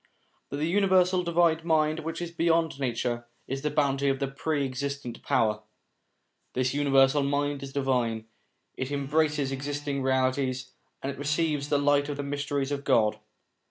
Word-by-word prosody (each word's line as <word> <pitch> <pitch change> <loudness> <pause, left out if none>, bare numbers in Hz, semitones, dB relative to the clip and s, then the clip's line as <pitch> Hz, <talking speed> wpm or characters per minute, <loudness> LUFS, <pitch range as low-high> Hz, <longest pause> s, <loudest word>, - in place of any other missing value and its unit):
But 140 - -4
the 150 - 0
universal 185 -1 +3
divine 170 -2 +2
mind 155 -1 +2
which 165 +2 -4
is 170 - -5
beyond 165 -3 +1
nature, 120 -2 -2 0.2
is 135 +1 -3
the 150 - 0
bounty 140 -2 +1
of 135 - +1
the 140 - 0
Pre 140 +1 -1
existent 135 -2 -4
Power. 105 -1 +1 0.9
This 130 0 0
universal 140 0 +4
mind 140 0 0
is 135 -1 -7
divine; 125 -5 0 0.5
it 130 +1 -4
embraces 145 0 +1
existing 140 +1 -3
realities, 130 0 0 0.3
and 135 - -1
it 140 - -10
receives 150 0 0
the 145 - +3
light 145 0 +2
of 145 - -3
the 145 - -3
mysteries 140 0 -2
of 140 -1 -2
God. 110 -6 +3
140 Hz, 160 wpm, -27 LUFS, 135-150 Hz, 0.9 s, universal